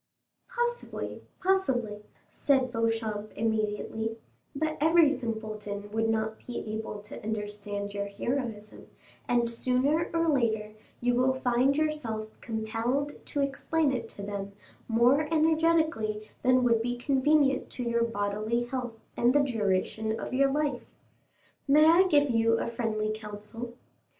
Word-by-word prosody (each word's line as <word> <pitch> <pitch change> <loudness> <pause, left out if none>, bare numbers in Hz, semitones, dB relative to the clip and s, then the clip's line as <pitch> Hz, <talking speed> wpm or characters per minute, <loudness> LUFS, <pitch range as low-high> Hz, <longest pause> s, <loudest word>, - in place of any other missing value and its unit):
"Possibly, 480 0 -3 0.2
possibly," 260 - +1 0.3
said 265 -3 +2
Beauchamp 225 -2 -1
immediately; 220 +1 -1 0.4
"but 310 +2 -1
every 320 -1 +6
simpleton 215 -5 -4
would 225 +1 0
not 220 0 -1
be 245 - -4 0.2
able 215 -1 -5
to 210 - -9
understand 205 -1 -4
your 200 0 -2
heroism, 215 0 -4 0.4
and 240 -1 +2
sooner 255 +7 +1
or 330 0 +1
later 220 -7 +1 0.3
you 245 0 +2
will 255 +2 +3
find 260 +2 +2
yourself 260 -9 -1
compelled 230 +5 -2
to 285 - -1
explain 280 +2 +1
it 235 -3 -3
to 200 - -9
them 200 -1 -5 0.3
more 250 +7 +3
energetically 315 -9 +2
than 255 0 +4
would 230 -2 +3
be 245 +1 -2
convenient 275 +2 +2
to 250 - -4
your 235 -1 +1
bodily 215 +1 -1
health 240 -2 -4 0.2
and 245 +3 +3
the 290 - +5
duration 220 -2 0
of - - -5
your 275 +1 +3
life. 285 -3 0 0.9
May 300 +2 +6
I 340 +4 +6
give 290 -5 +4
you 230 0 +3
a - - -1
friendly 215 -2 -1
counsel? 215 +2 -7
235 Hz, 130 wpm, -29 LUFS, 215-280 Hz, 0.9 s, every